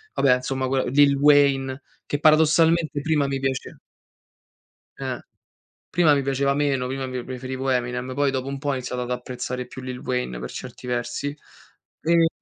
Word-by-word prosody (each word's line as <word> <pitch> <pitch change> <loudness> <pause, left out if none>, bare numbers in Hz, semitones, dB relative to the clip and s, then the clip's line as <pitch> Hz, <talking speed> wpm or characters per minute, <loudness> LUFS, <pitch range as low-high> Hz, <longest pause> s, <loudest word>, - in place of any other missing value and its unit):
vabbè 130 -2 +4
insomma 130 +1 -2
quella 135 0 +1
Lil 140 +1 +4
Wayne 140 -2 +4 0.2
che 145 - -2
paradossalmente 160 0 +4
prima 150 -2 +1
mi 135 0 -2
piace 135 -1 -3 1.2
Eh. - - -3 0.7
Prima 165 -3 +4
mi 140 - +2
piaceva 140 +1 +1
meno, 140 -3 0
prima 135 0 -3
mi 125 -1 -4
preferivo 130 +1 -4
Eminem, 125 0 -1
poi 140 +1 +2
dopo 130 0 -2
un 140 - -4
po' 145 0 -3
ho - - +2
iniziato 125 -1 -3
ad 120 - -7
apprezzare 125 0 -4
più 130 +1 -10
Lill 130 -1 -6
Wayne 125 - -2
per 65 - -6
certi - - -8
versi 125 +4 -2 0.7
e 165 0 +4
135 Hz, 165 wpm, -24 LUFS, 125-145 Hz, 1.2 s, vabbè